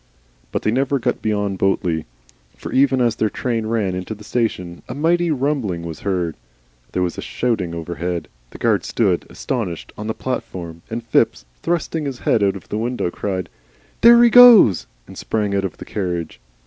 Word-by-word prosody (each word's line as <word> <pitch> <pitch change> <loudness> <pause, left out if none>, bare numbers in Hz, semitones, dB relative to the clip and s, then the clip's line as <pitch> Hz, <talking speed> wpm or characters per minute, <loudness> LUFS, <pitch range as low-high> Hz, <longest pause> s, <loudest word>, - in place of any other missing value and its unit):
But - - -2
they 110 - +2
never 135 +3 +1
got 125 - -2
beyond 105 -3 -1
Botley. 85 -6 0 0.5
For - - -7
even 135 -1 +3
as 120 -2 +1
their 110 - +1
train 115 -2 -2
ran 110 -5 0
into 90 +4 -4
the 105 - -13
station, 95 -7 -2
a - - -5
mighty 170 +3 +2
rumbling 130 - -1
was 80 -2 -6
heard, 90 -5 -1 0.6
there 90 - 0
was 90 - -3
a - - -3
shouting 105 -9 -2
overhead, 85 0 -4 0.2
the - - -11
guard - - +1
stood - - 0
astonished 105 -11 -4
on 105 - -5
the 110 - -2
platform, 85 -10 -5
and 115 +1 -4
Phipps, - - +1 0.2
thrusting 165 -2 -1
his 135 -3 -4
head 110 - +1
out 100 -1 +2
of 95 - -11
the 105 - -2
window, 120 -6 -2
cried, 95 -2 -3 0.5
"There 235 +1 +8
he 235 - +5
goes!" 235 - +8 0.2
and - - -13
sprang 105 -2 -1
out 100 0 0
of 95 - -5
the - - -9
carriage. 90 -5 -4
105 Hz, 185 wpm, -20 LUFS, 90-125 Hz, 0.6 s, There